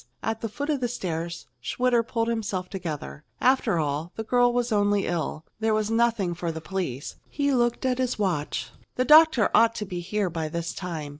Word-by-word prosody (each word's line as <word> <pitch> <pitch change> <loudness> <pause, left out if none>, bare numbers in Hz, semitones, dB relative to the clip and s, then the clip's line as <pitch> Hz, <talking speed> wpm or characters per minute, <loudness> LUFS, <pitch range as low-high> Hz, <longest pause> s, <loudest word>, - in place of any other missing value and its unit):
At 225 0 -2
the 225 - -2
foot 285 +7 -3
of 290 - 0
the 245 - +1
stairs, 170 -7 -4 0.2
Schwitter 245 - +2
pulled 230 0 -2
himself 210 -5 -2
together. 160 -5 -5 0.2
After 250 -7 +3
all, 150 +2 -1
the 220 - -4
girl 245 +2 +3
was 245 0 0
only 205 -1 +2
ill. 165 -2 -3
There 220 -1 +2
was 215 0 0
nothing 225 -6 +2
for 170 -1 -3
the 160 - -6
police. 160 -6 -4
He 285 -1 0
looked 240 0 +1
at 255 -1 +1
his 255 -1 0
watch. 180 -8 -1 0.2
The 255 - +1
doctor 310 -4 +6
ought 230 0 +5
to 210 - -3
be 180 -2 -5
here 190 +1 -1
by 160 -2 -3
this 170 +1 -3
time. 165 -6 -5
210 Hz, 200 wpm, -26 LUFS, 170-240 Hz, 0.2 s, doctor